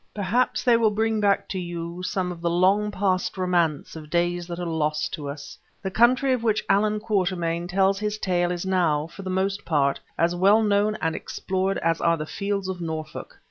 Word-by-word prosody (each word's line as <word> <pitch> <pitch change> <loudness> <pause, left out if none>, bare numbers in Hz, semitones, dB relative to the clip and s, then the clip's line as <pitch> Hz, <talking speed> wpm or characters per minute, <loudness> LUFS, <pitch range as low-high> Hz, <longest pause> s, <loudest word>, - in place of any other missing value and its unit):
Perhaps 210 +5 0
they 240 -3 +5
will 225 -1 +3
bring 220 +1 0
back 200 -1 +2
to 190 - -3
you 170 0 -5
some 185 -1 -2
of 170 -1 -9
the 170 - 0
long 190 +5 +3
past 190 -2 -1
romance 175 -6 0
of 155 -2 -9
days 175 +1 0
that 170 -1 -5
are 175 - -3
lost 155 -2 -1
to 145 -2 -5
us. 140 0 -8 0.2
The 190 - -3
country 255 +5 +4
of 250 - -1
which 220 -2 0
Allan 210 +1 +2
Quatermain 180 -5 -1
tells 195 +1 +2
his 210 0 -2
tale 175 -3 0
is 175 +1 -3
now, 170 -6 +1
for 170 +4 -11
the 190 - -5
most 195 +2 -1
part, 140 -4 +1 0.2
as 170 +1 +2
well 200 +5 +4
known 210 0 +2
and 160 0 0
explored 190 +1 -2
as 165 0 +1
are 170 0 +3
the 155 - -4
fields 200 +3 -3
of 185 -2 -4
Norfolk. 160 -2 -6
185 Hz, 205 wpm, -24 LUFS, 170-205 Hz, 0.2 s, they